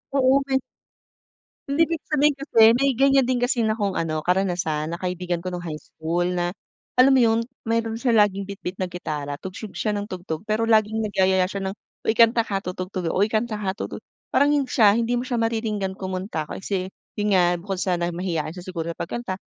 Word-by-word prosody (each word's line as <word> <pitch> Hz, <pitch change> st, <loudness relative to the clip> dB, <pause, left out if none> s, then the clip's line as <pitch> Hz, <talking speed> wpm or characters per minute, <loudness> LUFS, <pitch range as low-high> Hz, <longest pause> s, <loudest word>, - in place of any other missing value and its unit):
Oo 270 Hz, 0 st, +4 dB
may 265 Hz, -1 st, +1 dB, 1.1 s
hindi 325 Hz, +4 st, +4 dB
ibig 330 Hz, -1 st, -3 dB
sabihin 300 Hz, -1 st, +3 dB
kasi 275 Hz, -4 st, -1 dB
may 275 Hz, +3 st, +2 dB
ganyan 270 Hz, -1 st, +4 dB
din 255 Hz, -, +1 dB
kasi 245 Hz, 0 st, +1 dB
na 220 Hz, 0 st, +1 dB
akong 200 Hz, -3 st, 0 dB
ano 155 Hz, -2 st, -2 dB
karanasan 175 Hz, -4 st, 0 dB
na 170 Hz, -, -4 dB
kaibigan 180 Hz, -1 st, -3 dB
ko 185 Hz, -, -3 dB
nung 175 Hz, -, -4 dB
high 160 Hz, -3 st, -5 dB
school 165 Hz, +3 st, -3 dB
na 175 Hz, -1 st, 0 dB, 0.5 s
alam 265 Hz, +2 st, +7 dB
mo 260 Hz, -, +5 dB
yun, 225 Hz, 0 st, +3 dB, 0.3 s
meron 225 Hz, 0 st, 0 dB
siya 240 Hz, 0 st, +1 dB
laging 200 Hz, -2 st, +3 dB
bitbit 190 Hz, -2 st, -5 dB
na 185 Hz, -, -1 dB
gitara 150 Hz, -5 st, -4 dB
tugtog 190 Hz, +2 st, -8 dB
siya 215 Hz, -, 0 dB
ng 205 Hz, +1 st, -4 dB
tugtog, 175 Hz, -3 st, -5 dB
pero 215 Hz, +1 st, 0 dB
laging 220 Hz, 0 st, +3 dB
nagyayaya 190 Hz, -2 st, +2 dB
siya 200 Hz, 0 st, -5 dB
ng -, -, -5 dB, 0.3 s
uy, 220 Hz, -, +3 dB
kanta 230 Hz, 0 st, +6 dB
ka 205 Hz, -3 st, -2 dB
tutugtog 185 Hz, 0 st, -4 dB
ako, -, -, -2 dB
uy 205 Hz, -, +3 dB
kanta 220 Hz, 0 st, 0 dB
ka 195 Hz, -1 st, -3 dB
tutu -, -, -5 dB, 0.3 s
parang 285 Hz, +1 st, +4 dB
hin 290 Hz, -2 st, +2 dB
siya 215 Hz, -4 st, +4 dB
hindi 235 Hz, +1 st, 0 dB
mo 245 Hz, -, +1 dB
siya 250 Hz, -1 st, -2 dB
mariringgan 220 Hz, -4 st, -1 dB
kumunta 185 Hz, -4 st, -4 dB
kasi 190 Hz, -1 st, -3 dB, 0.2 s
yun 205 Hz, -1 st, +1 dB
nga 175 Hz, -1 st, +4 dB
bukod 195 Hz, -1 st, -4 dB
sa 185 Hz, 0 st, 0 dB
na 170 Hz, 0 st, 0 dB
mahiyain 170 Hz, -3 st, -2 dB
siya 180 Hz, -, -9 dB
siguro 170 Hz, -3 st, -4 dB
sa 170 Hz, -, -6 dB
pagkanta 190 Hz, 0 st, -4 dB
200 Hz, 205 wpm, -24 LUFS, 180-230 Hz, 1.1 s, alam